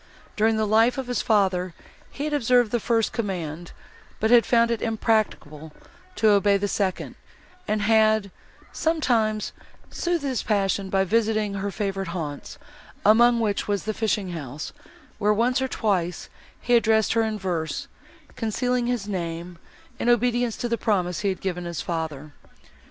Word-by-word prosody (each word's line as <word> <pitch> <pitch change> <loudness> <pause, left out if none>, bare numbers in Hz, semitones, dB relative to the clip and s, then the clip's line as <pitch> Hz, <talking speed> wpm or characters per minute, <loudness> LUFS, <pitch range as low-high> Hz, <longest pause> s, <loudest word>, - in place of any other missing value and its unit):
During 220 +1 +2
the 220 - +1
life 225 +4 +3
of 265 - -3
his 245 0 -1
father, 185 -5 +1 0.3
he 280 - -6
had 300 0 -2
observed 245 -4 +3
the 240 - +1
first 225 0 0
command, 175 -7 -4 0.5
but 220 +1 +1
had 240 -1 +6
found 235 -1 +3
it 230 - -1
impracticable 215 -9 -1 0.4
to 220 - +3
obey 200 0 +4
the 205 +1 -1
second, 195 -2 -2 0.5
and 215 -1 0
had, 220 -2 +3 0.4
sometimes, 230 -10 0 0.4
soothed 345 -3 -1
his 260 -5 -1
passion 200 -2 0
by 190 0 +2
visiting 215 0 +1
her 200 0 -3
favourite 195 -2 -3
haunts, 145 -4 -6 0.5
among 235 +3 +6
which 210 -3 -1
was 205 -1 -1
the 215 - -2
fishing 210 -4 -1
house, 150 -3 -6 0.5
where, 210 0 +2
once 250 +4 +1
or 265 - 0
twice, 185 -8 -1 0.3
he 245 - -1
addressed 220 -1 +3
her 230 - +2
in 220 -1 -1
verse, 175 -5 -3 0.5
concealing 245 +2 -1
his 240 -5 -2
name, 170 -2 -5 0.4
in 240 - 0
obedience 240 -1 +2
to 240 - -2
the 235 -1 -1
promise 180 -5 0
he 200 - 0
had 190 - -4
given 180 -2 -3
his 170 -3 -5
father. 155 -3 -4
215 Hz, 155 wpm, -24 LUFS, 185-230 Hz, 0.5 s, had